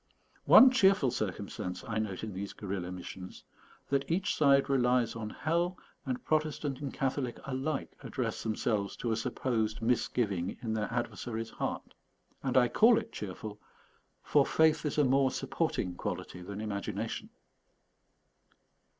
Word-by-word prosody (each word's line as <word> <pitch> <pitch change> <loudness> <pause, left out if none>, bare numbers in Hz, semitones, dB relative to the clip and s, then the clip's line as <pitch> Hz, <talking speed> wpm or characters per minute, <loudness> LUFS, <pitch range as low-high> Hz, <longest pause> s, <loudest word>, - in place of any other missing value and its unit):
One 260 - +9
cheerful 195 - +4
circumstance 95 -4 -4
I - - -1
note 105 -3 -3
in 110 -2 -4
these 100 +2 -5
guerrilla 95 -3 -4
missions, 90 0 -8 0.5
that 140 0 0
each 190 +5 +1
side 140 -2 +4
relies 125 -4 +2
on 110 -2 -4
hell, 170 +8 -1 0.3
and 125 -1 -3
Protestant 150 -3 -1
and 140 -2 -3
Catholic 130 -2 -2
alike 135 +2 -3
address - - -3
themselves 110 -2 -1
to 120 - -2
a - - +2
supposed 110 -1 -1
misgiving 110 -5 0
in 110 -2 -1
their 110 0 -2
adversary's 115 -1 -3
heart. - - -4 0.5
And 130 -1 0
I 125 -1 +6
call 225 - +5
it 225 0 -3
cheerful, 105 +1 -6 0.6
for 145 - +4
faith 160 +1 +3
is 145 - -3
a 150 - +5
more 135 0 +4
supporting 90 -7 -1
quality 90 +1 -5
than 100 +3 -6
imagination. 100 -2 -4
120 Hz, 140 wpm, -31 LUFS, 105-140 Hz, 0.6 s, One